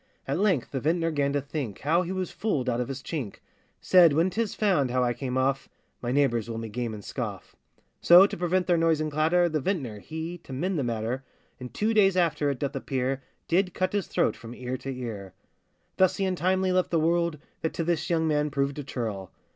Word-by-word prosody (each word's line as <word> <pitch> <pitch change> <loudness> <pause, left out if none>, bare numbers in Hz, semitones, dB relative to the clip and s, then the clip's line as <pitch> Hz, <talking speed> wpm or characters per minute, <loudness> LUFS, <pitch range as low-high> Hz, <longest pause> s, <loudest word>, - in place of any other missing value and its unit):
At - - -1
length 190 - +1
the 135 - -2
vintner 165 +4 +1
'gan 140 -2 0
to 145 - +1
think 140 -7 -5
How 165 +5 +2
he 180 0 -4
was 185 -1 -3
fooled 150 - -1
out 125 -1 0
of 125 - -3
his 135 -1 -6
chink; 135 - -4 0.4
Said, 175 -5 +6
'When 165 +5 +2
'tis 220 +2 -2
found 185 - +2
how 125 +1 +1
I 120 -1 +1
came 125 +1 -3
off, 135 +1 0 0.3
My 120 - -2
neighbours 125 -4 +1
will 115 - -4
me 115 0 -5
game 115 0 -3
and 105 - -10
scoff.' - - -5 0.5
So 175 +3 +9
to - - -3
prevent 180 +1 0
their 175 -2 +2
noise 165 -2 +3
and 155 0 -2
clatter 160 +4 +3
The 155 -2 -1
vintner 130 - -2
he, 160 - -6
to - - -14
mend 175 +5 -1
the - - 0
matter, 120 +2 -2 0.4
In 125 -1 -7
two 215 - 0
days 195 -3 +4
after, 155 -4 +2
it 140 - -2
doth 140 +1 -3
appear, 135 0 -2 0.3
Did 180 +1 +1
cut 185 +1 0
his 205 -2 -1
throat - - +1
from 120 0 -10
ear 125 +1 -4
to 135 - -7
ear. 110 -7 -6 0.6
Thus 185 -1 +3
he 195 - 0
untimely 185 +1 +1
left 185 0 +2
the 165 - +2
world, 170 0 +1 0.2
That 160 - -2
to 165 - -1
this 165 -1 -1
young 160 -2 +1
man 150 -1 +1
proved 140 0 -1
a - - -4
churl. 110 -8 -4
150 Hz, 225 wpm, -27 LUFS, 125-175 Hz, 0.6 s, So